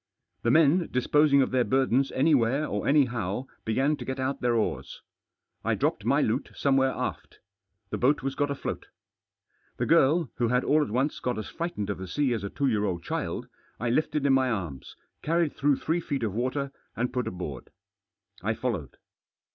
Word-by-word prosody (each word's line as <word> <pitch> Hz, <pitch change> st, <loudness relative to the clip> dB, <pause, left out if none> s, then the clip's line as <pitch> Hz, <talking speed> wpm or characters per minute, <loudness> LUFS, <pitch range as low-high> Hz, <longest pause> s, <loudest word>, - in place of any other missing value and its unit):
The 115 Hz, -, +1 dB
men, 160 Hz, +5 st, +4 dB
disposing 140 Hz, +2 st, +4 dB
of -, -, -3 dB
their 125 Hz, -1 st, +3 dB
burdens 135 Hz, +1 st, +2 dB
anywhere 140 Hz, -1 st, +3 dB
or 105 Hz, -7 st, -3 dB
anyhow, 125 Hz, -6 st, +1 dB, 0.2 s
began 135 Hz, +7 st, +2 dB
to -, -, -6 dB
get 130 Hz, 0 st, -4 dB
out 130 Hz, +1 st, -2 dB
their 120 Hz, -1 st, +2 dB
oars. 110 Hz, -, -2 dB, 0.6 s
I -, -, +1 dB
dropped -, -, -1 dB
my -, -, +3 dB
loot -, -, -1 dB
some^ 140 Hz, -1 st, +2 dB
where 135 Hz, 0 st, +4 dB
aft -, -, -5 dB, 0.5 s
The -, -, -2 dB
boat 145 Hz, +3 st, +2 dB
was 135 Hz, 0 st, -1 dB
got 145 Hz, +1 st, 0 dB
afloat 140 Hz, -, -4 dB, 0.9 s
The -, -, 0 dB
girl 155 Hz, +1 st, +4 dB
— -, -, -49 dB
who 120 Hz, -, +1 dB
had 125 Hz, +2 st, +2 dB
all 155 Hz, +1 st, +3 dB
at 145 Hz, -, -1 dB
once 130 Hz, +7 st, 0 dB
got 125 Hz, -2 st, -2 dB
as 110 Hz, -, -5 dB
frightened 165 Hz, -, -3 dB
of 100 Hz, -, -5 dB
the 95 Hz, -, -6 dB
sea 135 Hz, +5 st, 0 dB
as 110 Hz, -4 st, -3 dB
a 100 Hz, -, -3 dB
two 140 Hz, -, -2 dB
year 110 Hz, -6 st, +2 dB
old 90 Hz, -4 st, -2 dB
child -, -, -3 dB, 0.2 s
— -, -, -35 dB
I 120 Hz, 0 st, 0 dB
lifted 150 Hz, +1 st, 0 dB
in 140 Hz, -, +4 dB
my 130 Hz, -1 st, +3 dB
arms, 85 Hz, -, -4 dB, 0.3 s
carried 165 Hz, -1 st, +1 dB
through 145 Hz, 0 st, +2 dB
three 165 Hz, +5 st, -1 dB
feet 140 Hz, -6 st, -3 dB
of 105 Hz, -4 st, -1 dB
water, 130 Hz, +4 st, -2 dB, 0.2 s
and 125 Hz, +2 st, -2 dB
put 125 Hz, -1 st, -1 dB
aboard. 80 Hz, -8 st, -6 dB, 0.7 s
I 110 Hz, +4 st, -1 dB
followed. 105 Hz, -, -3 dB
130 Hz, 195 wpm, -27 LUFS, 115-145 Hz, 0.9 s, men